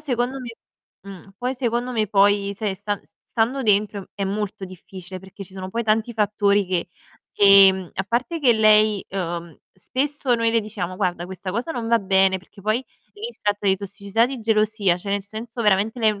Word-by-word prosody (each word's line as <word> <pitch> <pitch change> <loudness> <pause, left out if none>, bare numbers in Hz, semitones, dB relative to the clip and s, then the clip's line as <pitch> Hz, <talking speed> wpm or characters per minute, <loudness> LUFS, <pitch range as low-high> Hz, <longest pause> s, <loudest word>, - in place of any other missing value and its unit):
secondo 250 -1 -2
me 245 - -7 0.6
mh, 195 0 -12
poi 250 +2 -2
secondo 245 0 -2
me, 220 -3 0
poi, 200 0 +3
sai, 210 -3 -2
stan 205 +2 -4
s - - -33 0.2
stando 245 +4 0
dentro 205 -2 +1
è 200 - -3
m - - -2
è - - -2
molto 205 -2 -4
difficile, 185 0 -10
perché 190 +1 -11
ci 190 - -14
sono 190 -1 -6
poi 235 +4 -2
tanti 220 +2 +1
fattori 205 -2 +1
che 180 0 -2 0.5
ehm, 195 -2 +6
a 190 - -1
parte 250 - -2
che 255 -5 +5
lei 215 -2 +4
uhm, 170 -3 -4 0.2
spesso 265 +6 -1
noi 230 -1 +1
le 230 0 +2
diciamo: 190 -4 -5
"Guarda 180 -3 -1
questa 185 0 -6
cosa 240 - -2
non 235 -4 -4
va 230 0 +4
bene." 190 -1 +3
Perché 195 +2 -18
poi 215 +5 0 0.3
lì 440 +3 -6
si - - -12
tratta 205 0 -1
di 190 0 +4
tossicità, 200 +3 -1
di 265 -2 -6
gelosia, 215 -4 +2
cioè 200 +2 -4
nel 200 -1 -1
senso 225 +3 -6
veramente 210 +2 +2
lei 220 -1 +4
n 205 - -9
205 Hz, 205 wpm, -22 LUFS, 190-230 Hz, 0.6 s, ehm